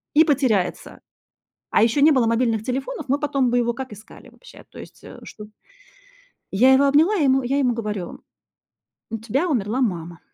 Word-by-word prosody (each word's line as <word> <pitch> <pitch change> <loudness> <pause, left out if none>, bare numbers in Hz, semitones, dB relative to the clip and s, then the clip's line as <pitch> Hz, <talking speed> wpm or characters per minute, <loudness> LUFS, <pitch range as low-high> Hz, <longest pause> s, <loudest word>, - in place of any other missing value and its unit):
и 315 - +7
потеряется. 255 - -1 0.7
А - - +3
ещё 235 +5 +1
не 310 - +6
было 260 -5 +2
мобильных 230 -1 0
телефонов, 270 - -4
мы 275 +2 0
потом 275 -4 0
бы 245 - +1
его 235 0 0
как 260 -2 -8
искали 210 +2 -15
вообще, - - -17
то - - -13
есть, - - -14
э, - - -12
чтобы 210 0 -12 1.0
Я 255 +7 +5
его 280 +2 +4
обняла, 315 +9 +3
я 320 - 0
ему 265 -1 +2
я 270 +3 -1
ему 250 -3 +1
говорю: 210 -6 -6 0.9
"У 225 - -3
тебя 245 +10 -2
умерла 245 - -1
мама". 175 -6 -3
250 Hz, 180 wpm, -21 LUFS, 220-280 Hz, 1.0 s, и